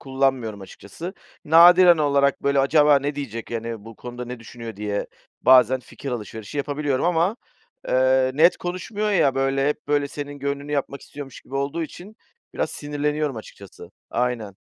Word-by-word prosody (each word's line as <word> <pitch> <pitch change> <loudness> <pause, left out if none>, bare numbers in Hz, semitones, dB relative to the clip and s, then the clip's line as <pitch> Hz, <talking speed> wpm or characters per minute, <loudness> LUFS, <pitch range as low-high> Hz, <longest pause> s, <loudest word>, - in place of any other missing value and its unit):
kullanmıyorum 130 -6 -1
açıkçası. 130 - -9 0.3
Nadiren 175 +2 +7
olarak, 140 -2 +2
böyle, 140 0 +2
acaba 145 +1 +5
ne 145 +2 -3
diyecek, 115 -6 -6
hani, 115 -2 -5
bu 115 -1 -11
konuda 125 0 -7
ne 125 0 -8
düşünüyor 115 -1 -9
diye 105 0 -3 0.4
bazen 130 0 +6
fikir 135 +3 -8
alışverişi 110 +1 -6
yapabiliyorum 145 -1 -1
ama, 175 +4 +2 0.5
eee, 130 0 +3
net 165 +5 +5
konuşmuyor 200 +4 -3
ya, 140 -9 +3
böyle, 135 +1 +1
hep 150 0 -4
böyle 145 -1 +1
senin 145 0 -7
gönlünü 140 +1 -4
yapmak 140 -1 -2
istiyormuş 140 -3 -10
gibi 135 - -13
olduğu 140 +4 -1
için 185 +6 -9 0.4
biraz - - -1
sinirleniyorum 150 -1 -2
açıkçası, 100 -3 -12 0.2
aynen. 115 -5 -2
140 Hz, 150 wpm, -23 LUFS, 125-150 Hz, 0.5 s, Nadiren